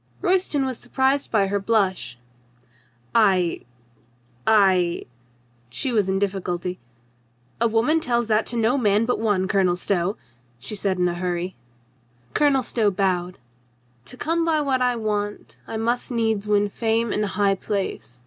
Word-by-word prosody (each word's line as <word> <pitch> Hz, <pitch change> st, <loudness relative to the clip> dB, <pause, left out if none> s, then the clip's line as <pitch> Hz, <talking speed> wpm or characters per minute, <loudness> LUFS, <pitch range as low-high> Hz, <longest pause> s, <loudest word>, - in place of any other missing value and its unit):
Royston 360 Hz, -7 st, +1 dB
was 260 Hz, -3 st, -4 dB
surprised 265 Hz, +3 st, 0 dB
by 205 Hz, -3 st, +2 dB
her 200 Hz, +1 st, -1 dB
blush. 195 Hz, -, 0 dB, 1.0 s
"I 190 Hz, -6 st, +2 dB, 0.4 s
— 120 Hz, 0 st, -36 dB
I 190 Hz, -5 st, +3 dB, 0.2 s
— 120 Hz, 0 st, -37 dB
" 120 Hz, 0 st, -37 dB
she 265 Hz, -, -1 dB
was 210 Hz, -5 st, +1 dB
in 190 Hz, -, +1 dB
difficulty 185 Hz, -2 st, -2 dB, 0.4 s
— 120 Hz, -, -37 dB
"a 235 Hz, -, +5 dB
woman 230 Hz, +8 st, +2 dB
tells 240 Hz, -5 st, 0 dB
that 220 Hz, 0 st, +1 dB
to 240 Hz, -, -3 dB
no 235 Hz, +4 st, +2 dB
man 210 Hz, -1 st, +2 dB
but 250 Hz, -, 0 dB
one. 205 Hz, -4 st, +1 dB
Colonel 190 Hz, -3 st, +2 dB
Stow," 180 Hz, +1 st, -1 dB, 0.4 s
she 125 Hz, -, -7 dB
said 195 Hz, -2 st, -1 dB
in 180 Hz, 0 st, +2 dB
a 175 Hz, -, -1 dB
hurry. 180 Hz, +1 st, -3 dB, 0.8 s
Colonel 280 Hz, -3 st, +3 dB
Stow 225 Hz, -3 st, +1 dB
bowed. 185 Hz, -2 st, -1 dB, 0.7 s
"To 250 Hz, -, -7 dB
come 330 Hz, +4 st, 0 dB
by 325 Hz, -2 st, +2 dB
what 270 Hz, -3 st, 0 dB
I 250 Hz, -1 st, +2 dB
want 210 Hz, -2 st, -3 dB
I 225 Hz, -, -4 dB
must 235 Hz, +2 st, -1 dB
needs 220 Hz, -4 st, 0 dB
win 205 Hz, 0 st, +3 dB
fame 225 Hz, +1 st, 0 dB
and 210 Hz, -, 0 dB
high 200 Hz, 0 st, +1 dB
place. 195 Hz, -, -3 dB
205 Hz, 160 wpm, -23 LUFS, 180-235 Hz, 1.0 s, a